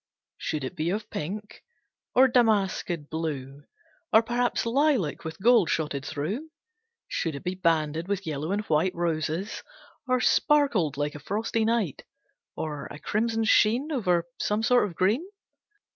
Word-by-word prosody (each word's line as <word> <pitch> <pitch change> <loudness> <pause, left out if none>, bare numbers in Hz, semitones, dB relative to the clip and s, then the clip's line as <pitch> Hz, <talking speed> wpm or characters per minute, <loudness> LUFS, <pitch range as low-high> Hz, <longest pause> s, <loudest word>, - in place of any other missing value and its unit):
Should 150 -3 -3
it 130 - -5
be 160 +2 -1
of 210 +4 -3
pink, 205 +7 -5 0.5
or 260 +1 +7
damasked 200 - +1
blue? 145 -3 -4 0.5
Or 220 - +6
perhaps 240 +1 0
lilac 235 - +1
with 160 -1 -6
gold 230 -4 +5
shotted 150 -3 -1
through? 180 - -4 0.6
Should 165 -4 -2
it 140 - -7
be 180 - -2
banded 165 -2 0
with 200 -1 -2
yellow 155 +1 -3
and 205 +1 0
white 160 +4 +1
Roses, 170 +3 -2 0.5
or 255 0 +2
sparked 250 - +3
like 145 0 -1
a 150 - -8
frosty 220 +7 -1
night? 225 - 0 0.5
Or 150 -3 -4
a - - -9
crimson 225 +6 0
sheen 235 +7 +3
Over 180 - +1
some 210 +2 0
sort 245 -2 +4
of 175 - -10
green? 210 - +2
185 Hz, 145 wpm, -27 LUFS, 155-225 Hz, 0.6 s, or